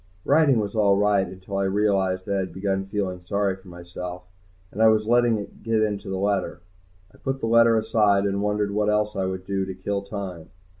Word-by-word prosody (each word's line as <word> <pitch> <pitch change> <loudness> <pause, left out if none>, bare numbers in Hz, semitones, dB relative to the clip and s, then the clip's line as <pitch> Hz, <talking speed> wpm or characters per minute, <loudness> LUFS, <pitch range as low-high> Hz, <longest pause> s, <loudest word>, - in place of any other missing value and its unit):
Writing 145 -3 +4
was 105 -2 -2
all 100 -2 +3
right, 100 -1 +2
until 95 +2 -7
I 100 - +1
realized 95 -2 +1
that 100 - -2
I 100 - +1
had 95 -1 -4
begun 95 0 -2
feeling 95 -3 -3
sorry 100 +1 0
for 95 0 -19
myself, 90 +1 -8 0.5
and 105 - -4
I 110 - +7
was 110 -1 +3
letting 120 0 +3
it 100 - -9
get 115 -1 +1
into 105 -2 -3
the 95 - -2
letter. 100 -2 -1 0.5
I - - -19
put 135 0 -3
the - - -3
letter 115 0 +5
aside 105 -2 +2
and 100 0 -1
wondered 105 0 0
what 105 +1 +1
else 105 0 0
I 95 -1 -1
could 95 0 -4
do 95 0 -1
to 95 0 -5
kill 100 +2 -3
time. 100 -5 -7
100 Hz, 215 wpm, -24 LUFS, 95-105 Hz, 0.5 s, I